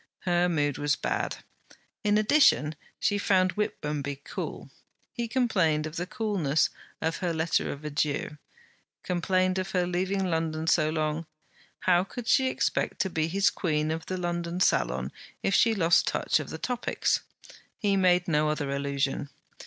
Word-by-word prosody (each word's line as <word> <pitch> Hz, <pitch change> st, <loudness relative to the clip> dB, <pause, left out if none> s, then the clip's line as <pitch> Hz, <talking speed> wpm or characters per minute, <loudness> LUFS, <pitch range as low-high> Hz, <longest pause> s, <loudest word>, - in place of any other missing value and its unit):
Her 175 Hz, 0 st, +2 dB
mood 145 Hz, -4 st, 0 dB
was 145 Hz, -1 st, +2 dB
bad. -, -, -3 dB, 0.6 s
In 210 Hz, 0 st, +3 dB
addition, 215 Hz, -, +4 dB, 0.3 s
she 205 Hz, -1 st, +1 dB
found 185 Hz, -2 st, +3 dB
Whitmonby 150 Hz, -9 st, -2 dB
cool; -, -, -6 dB, 0.4 s
he 235 Hz, -1 st, -3 dB
complained 185 Hz, -11 st, +1 dB
of 155 Hz, +1 st, -6 dB
the 175 Hz, +1 st, -3 dB
coolness 195 Hz, -9 st, 0 dB, 0.3 s
of 160 Hz, +1 st, 0 dB
her 180 Hz, -2 st, -1 dB
letter 160 Hz, +1 st, 0 dB
of 145 Hz, +2 st, -8 dB
adieu; 150 Hz, 0 st, -2 dB, 0.6 s
complained 185 Hz, +1 st, +1 dB
of 185 Hz, -, -4 dB
her 180 Hz, -1 st, +2 dB
leaving 190 Hz, +2 st, -1 dB
London 160 Hz, -2 st, -1 dB
so 155 Hz, -2 st, +3 dB
long. 155 Hz, 0 st, -1 dB, 0.5 s
How 180 Hz, -1 st, +4 dB
could 230 Hz, +4 st, -8 dB
she 265 Hz, 0 st, +4 dB
expect -, -, -1 dB
to 190 Hz, -, -1 dB
be 160 Hz, -1 st, 0 dB
his 195 Hz, +4 st, +2 dB
Queen 155 Hz, -3 st, 0 dB
of 160 Hz, 0 st, -4 dB
the 185 Hz, -, -2 dB
London 175 Hz, 0 st, -2 dB
Salon 65 Hz, -, +1 dB, 0.3 s
if 195 Hz, -, +1 dB
she 225 Hz, +2 st, +4 dB
lost 170 Hz, -3 st, +3 dB
touch -, -, +1 dB
of -, -, -6 dB
the -, -, -5 dB
topics? 245 Hz, -1 st, 0 dB, 0.6 s
He 205 Hz, -3 st, +1 dB
made 180 Hz, -2 st, +3 dB
no 150 Hz, -2 st, +2 dB
other 145 Hz, -2 st, -2 dB
allusion. 140 Hz, 0 st, -1 dB
170 Hz, 155 wpm, -28 LUFS, 150-190 Hz, 0.6 s, addition